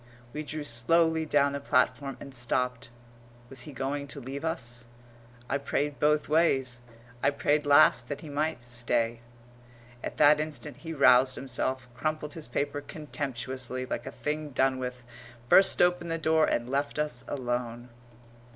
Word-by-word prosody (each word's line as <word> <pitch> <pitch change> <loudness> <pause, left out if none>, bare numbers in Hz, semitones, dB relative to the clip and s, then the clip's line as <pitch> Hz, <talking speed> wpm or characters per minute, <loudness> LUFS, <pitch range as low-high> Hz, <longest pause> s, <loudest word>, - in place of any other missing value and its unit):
We 150 - -3
drew 155 0 -5
slowly 160 +6 +3
down 145 -1 +3
the 140 - -3
platform 135 0 +1
and 140 - -10
stopped. 125 0 -1 0.6
Was 130 - -6
he - - -7
going 140 +2 -3
to 140 - -6
leave 135 +3 -6
us? 125 -7 -2 0.6
I 140 +3 -1
prayed 145 +1 -2
both 150 0 +2
ways 135 -6 +2 0.4
I 140 - +4
prayed 145 +1 0
last 140 -4 +5
that 145 - -4
he 160 - -9
might 145 -3 -2
stay. 120 -1 0 0.8
At - - -5
that 150 +1 +6
instant 150 -6 -5
he 165 +3 -8
roused 130 -3 +5
himself, 130 0 -2
crumpled 155 +3 -3
his 160 -2 -5
paper 145 +4 -2
contemptuously, 130 -4 -5
like 130 - -5
a - - -4
thing 150 +1 -3
done 130 -1 +1
with, 125 -1 -5 0.5
burst 190 -2 +6
open 175 -1 +1
the 165 0 -1
door, 160 -1 +3
and 120 0 0
left 140 +3 -2
us 150 -5 -2
alone. 120 -2 -3
140 Hz, 155 wpm, -28 LUFS, 125-150 Hz, 0.8 s, that